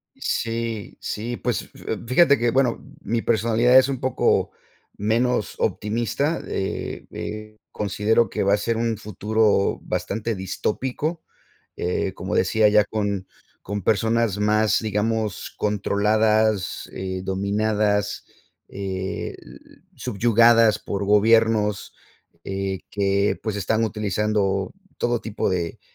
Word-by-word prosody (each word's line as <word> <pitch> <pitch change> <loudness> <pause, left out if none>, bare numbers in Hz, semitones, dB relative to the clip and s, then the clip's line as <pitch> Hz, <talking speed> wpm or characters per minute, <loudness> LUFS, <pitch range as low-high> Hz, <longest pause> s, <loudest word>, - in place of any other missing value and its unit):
Sí, 115 -2 -3
sí, 120 +3 -4
pues 120 -2 -1 0.2
eh, - - -1
fíjate 140 +4 +5
que, 120 0 +1
bueno, 130 -2 +1 0.2
mi 115 +1 -1
personalidad 115 +3 +3
es 130 - +2
un 135 -3 -3
poco 130 -1 +1 0.5
menos 115 +1 0
optimista, 120 +9 -1
eh, 95 - -4
eh, 110 0 -7
considero 105 +3 +1
que - - -1
va 100 +1 +3
a - - +4
ser 115 +3 -1
un 115 -1 -1
futuro 105 0 +1
bastante 110 +2 -3
distópico, 130 - -3 0.5
eh, 90 +1 -1
como 90 0 -4
decía 105 +4 +3
ya 105 0 +5
con 105 -3 -2 0.4
con 100 0 -4
personas 110 0 +1
más, 105 0 +3
digamos, 110 -1 -2
controladas, 105 0 +1
eh, 95 0 -4
dominadas, 105 +1 0 0.4
el 95 0 -6
subyugadas 115 -1 +4
por 100 0 -3
gobiernos, 105 0 +3 0.5
eh, 95 -1 -3
que, 100 0 +1
pues, 110 -3 -2
están 110 +3 0
utilizando 105 -2 -1 0.2
todo 120 -1 0
tipo 110 -2 -2
de 85 -3 -2
105 Hz, 115 wpm, -23 LUFS, 100-115 Hz, 0.5 s, fíjate